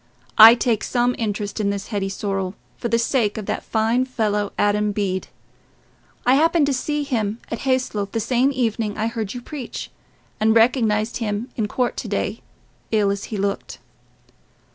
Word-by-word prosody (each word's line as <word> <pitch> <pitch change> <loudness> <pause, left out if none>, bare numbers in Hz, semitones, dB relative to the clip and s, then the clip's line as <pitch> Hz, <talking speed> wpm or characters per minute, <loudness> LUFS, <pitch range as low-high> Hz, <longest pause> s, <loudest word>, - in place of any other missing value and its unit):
I 225 +2 +11
take 235 -3 0
some 245 0 +1
interest 210 -1 -3
in 205 -1 +1
this 200 0 -4
Hetty 200 -3 -2
Sorrel, 195 -1 -3 0.2
for 235 - -3
the 230 0 +2
sake 230 -3 +1
of 215 - -4
that - - -2
fine 225 +3 +1
fellow, 210 -5 -1
Adam 205 0 +2
Bede. 195 -2 -2 1.0
I 250 - +5
happened 320 +2 +4
to 280 - 0
see 295 +3 -1
him 225 -6 -2
at 230 - -3
Hayslope 215 -6 0
the 225 - -1
same 250 +4 +2
evening 225 -5 -1
I 220 - 0
heard 225 -2 -3
you 245 - -6
preach, 275 -5 -7 0.5
and 220 +1 +3
recognized 225 -2 +3
him 215 +1 -3
in 215 -3 -1
court 250 +3 -1
to - - -4
day, - - -2 0.5
ill 210 -3 +2
as 200 0 -3
he 215 - -5
looked." 200 0 -3
220 Hz, 170 wpm, -22 LUFS, 205-245 Hz, 1.0 s, I